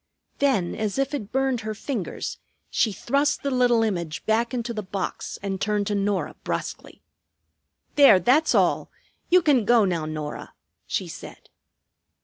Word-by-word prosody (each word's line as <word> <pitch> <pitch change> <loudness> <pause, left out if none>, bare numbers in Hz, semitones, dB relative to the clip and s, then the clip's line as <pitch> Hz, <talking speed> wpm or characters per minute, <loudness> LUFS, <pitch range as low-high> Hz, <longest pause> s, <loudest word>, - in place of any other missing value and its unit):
Then 255 -11 +2
as 215 0 -2
if 275 +1 0
it 220 -8 -4
burned 265 -2 0
her 215 0 -4
fingers 225 -4 -4 0.3
she 220 - +2
thrust 280 +8 0
the 280 - -1
little 245 -3 +3
image 170 -6 -3
back 225 +2 +1
into 240 -2 -3
the 215 - -3
box 195 -1 -4
and 195 -1 -3
turned 210 -1 0
to 210 - -1
Norah 200 -1 -1
brusquely. - - -5 0.9
"There, 275 -10 +8
that's 275 - +3
all. - - +2 0.4
You 360 0 +5
can 275 -7 +4
go 230 0 +4
now, 170 -4 -1
Norah," 155 -1 -6 0.3
she - - -2
said. - - -11
220 Hz, 150 wpm, -24 LUFS, 195-265 Hz, 0.9 s, There